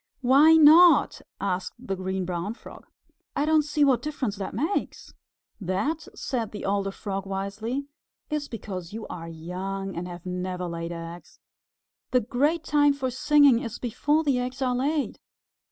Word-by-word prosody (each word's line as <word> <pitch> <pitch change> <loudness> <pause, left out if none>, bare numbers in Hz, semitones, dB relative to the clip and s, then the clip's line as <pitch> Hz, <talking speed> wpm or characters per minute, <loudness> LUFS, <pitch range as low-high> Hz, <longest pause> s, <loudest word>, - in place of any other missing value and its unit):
"Why 275 +5 +6
not?" 320 +3 +7 0.2
asked 185 -2 -2
the 220 -6 -4
Green 190 0 -3
Brown 180 +4 -3
Frog. - - -13 0.5
"I 285 - +1
don't 310 0 +4
see 295 0 0
what 260 -4 +3
difference 265 -7 -3
that 190 -1 -5
makes." 315 - -2 0.5
"That," 210 - -2
said 235 -6 -3
the 210 - -6
older 195 0 0
Frog 195 0 -5
wisely, 205 +8 -3 0.4
"is 300 -2 -3
because 190 -5 -7
you 220 0 -6
are 165 -1 -7
young 185 +4 -5
and 175 +1 -4
have 175 -1 -9
never 180 0 -3
laid 170 0 -4
eggs. 170 +1 -9 0.7
The 250 - +3
great 290 +9 0
time 290 -1 +3
for 265 -2 -3
singing 285 -1 +5
is 230 -2 -5
before 295 +6 0
the 275 -5 +1
eggs 250 +1 -4
are 255 -2 +1
laid. 280 +4 -1
225 Hz, 155 wpm, -26 LUFS, 185-285 Hz, 0.7 s, not